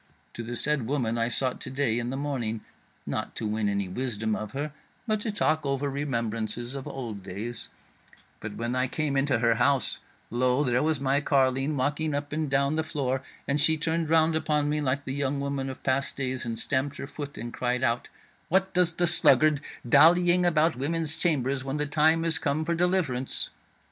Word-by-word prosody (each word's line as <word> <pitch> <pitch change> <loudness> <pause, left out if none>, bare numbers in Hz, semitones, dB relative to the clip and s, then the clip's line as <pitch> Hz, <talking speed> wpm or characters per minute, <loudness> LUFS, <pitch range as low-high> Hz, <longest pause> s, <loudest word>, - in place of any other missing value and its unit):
To - - -6
the 120 +1 -5
said 145 -3 0
woman 120 -4 0
I 115 - +2
sought 130 +1 0
to - - -4
day 130 -4 0
in 120 0 -3
the 135 - -3
morning, 125 -6 -2 0.4
not - - -3
to - - -3
win 105 -1 0
any 100 -1 -1
wisdom 110 0 -2
of 110 0 -5
her, 145 +2 -3 0.3
but 215 -3 0
to 220 - -2
talk 155 -6 +1
over 140 0 -1
remembrances 120 -3 -2
of 135 -1 -6
old 115 -7 -6
days; 100 +6 -4 0.7
but - - -6
when 120 +1 -2
I 130 +1 +1
came 145 +1 -2
into 135 -2 +2
her 115 0 +3
house, 140 0 +2 0.3
lo, 125 +3 +2
there 125 -2 +2
was 155 -1 +1
my 140 +1 +1
carline 135 +1 +1
walking 145 +3 0
up 145 0 -4
and 155 -1 -1
down 140 +2 +2
the 160 - +1
floor, 135 -4 -2 0.3
and 140 +1 +1
she 160 +1 +4
turned 160 0 -1
round 160 0 +4
upon 150 -2 +1
me 150 0 0
like 140 0 -1
the 130 - -3
young 140 0 -1
woman 140 -1 -2
of 130 - -9
past 135 +1 0
days, 130 -2 -2
and 115 -1 -2
stamped 140 +3 0
her - - -5
foot 145 0 -7
and 120 +1 -6
cried 125 0 -1
out: 120 -1 0 0.4
'What 190 +2 +2
does 180 -1 +3
the 175 +1 +1
sluggard 155 -3 +4 0.3
dallying 175 +6 +5
about 160 -1 +3
women's 160 +3 -2
chambers 140 -5 0
when 135 +2 -3
the 150 - 0
time 160 +3 +3
is 160 -4 +2
come 155 +3 -1
for 170 - -1
the 165 - -3
deliverance?' 170 -9 +1
140 Hz, 200 wpm, -27 LUFS, 125-155 Hz, 0.7 s, dallying